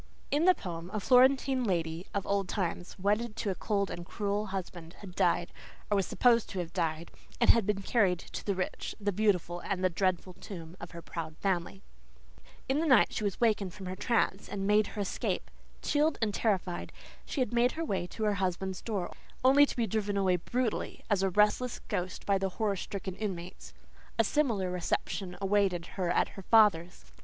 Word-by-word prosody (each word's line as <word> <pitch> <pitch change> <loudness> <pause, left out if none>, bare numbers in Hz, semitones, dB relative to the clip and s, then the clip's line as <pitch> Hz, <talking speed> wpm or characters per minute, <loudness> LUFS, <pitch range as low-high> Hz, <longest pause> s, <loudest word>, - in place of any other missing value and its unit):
In 295 +4 +2
the 370 0 +6
poem 170 -2 -6
a - - +1
Florentine 260 +2 +4
lady 170 -4 -1
of 200 -1 -2
old 200 -2 0
time, 180 -3 -1
wedded 210 +4 0
to 205 - -1
a - - 0
cold 200 0 -1
and 175 - -5
cruel 205 +3 -2
husband, 180 -3 -6
had 190 -3 -9
died, 175 -1 +1 0.4
or - - +4
was 195 -2 +1
supposed 235 +2 +3
to 195 - -6
have 175 -2 -4
died, 160 0 -2 0.3
and - - +7
had 230 -4 +1
been 200 -1 0
carried 195 -5 +3
to - - -8
"the 200 - -1
rich, 185 - -3
the 205 0 0
beautiful, 180 -4 +1 0.2
the 185 0 +1
dreadful 185 0 0
tomb" 175 -2 -9
of 175 - -8
her 170 -1 -10
proud 160 -2 -6
family. 175 - -2 0.8
In 270 +3 +1
the 325 - 0
night 255 -6 +5
she 210 -1 0
wakened 210 -6 +1
from 195 - -8
her 185 0 -4
trance 215 -2 0
and 195 -1 -3
made 210 +1 +4
her 210 - -5
escape. 200 - -2 0.3
Chilled 300 +1 +2
and 215 -3 0
terrified, 190 -6 -1 0.3
she - - -4
had 250 -3 0
made 240 +1 +3
her 330 +1 -3
way 190 - -1
to 220 - -6
her 210 -1 +2
husband's 190 0 -2
door, 200 -6 -3 0.3
only 285 +2 +7
to - - -5
be 235 - +2
driven 205 -1 -1
away 185 -2 +3
brutally 240 +6 -2
as 200 -2 +3
a 195 - +2
restless 210 +6 +2
ghost 185 +1 -3
by 200 -1 +2
the 195 0 0
horror 215 -3 +1
stricken 190 -1 -5
inmates. 185 -4 -5 0.5
A 225 - +5
similar 220 -7 +1
reception 180 +1 -2
awaited 195 -3 +1
her 185 -3 -1
at 175 - +2
her 195 - -10
father's. 190 -5 +3
195 Hz, 190 wpm, -30 LUFS, 180-220 Hz, 0.8 s, and